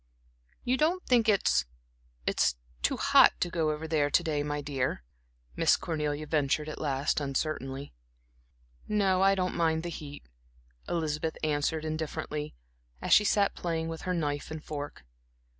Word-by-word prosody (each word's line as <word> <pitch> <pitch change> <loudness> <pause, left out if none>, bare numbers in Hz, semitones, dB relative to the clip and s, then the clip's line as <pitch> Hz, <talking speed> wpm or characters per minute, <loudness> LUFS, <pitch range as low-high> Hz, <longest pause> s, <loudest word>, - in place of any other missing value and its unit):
"You 255 +1 +1
don't 340 +5 +1
think 235 -3 +4
it's 200 -2 +3 0.6
it's - - +2 0.3
too - - +1
hot - - +5
to 175 - -1
go 160 -3 +1
over 155 +1 -3
there 150 -2 +2
to 175 - +3
day, 155 -3 0
my 145 0 -2
dear?" 135 - -2 0.5
Miss - - +4
Cornelia 150 -2 -2
ventured 150 0 0
at 155 - -7
last 140 -2 0
uncertainly. 140 -1 -3 0.9
"No, 195 -3 +2
I 195 0 +5
don't 185 -1 -1
mind 160 -1 +1
the 175 - -3
heat," 145 -4 -8 0.6
Elizabeth 160 -1 -1
answered 155 +1 0
indifferently, 155 - -4 0.4
as - - +1
she 210 - +7
sat 200 0 +3
playing 165 -2 -2
with 165 0 -6
her 185 - -2
knife 145 -3 -2
and 155 -1 -6
fork. 145 - -6
155 Hz, 150 wpm, -29 LUFS, 145-175 Hz, 0.9 s, she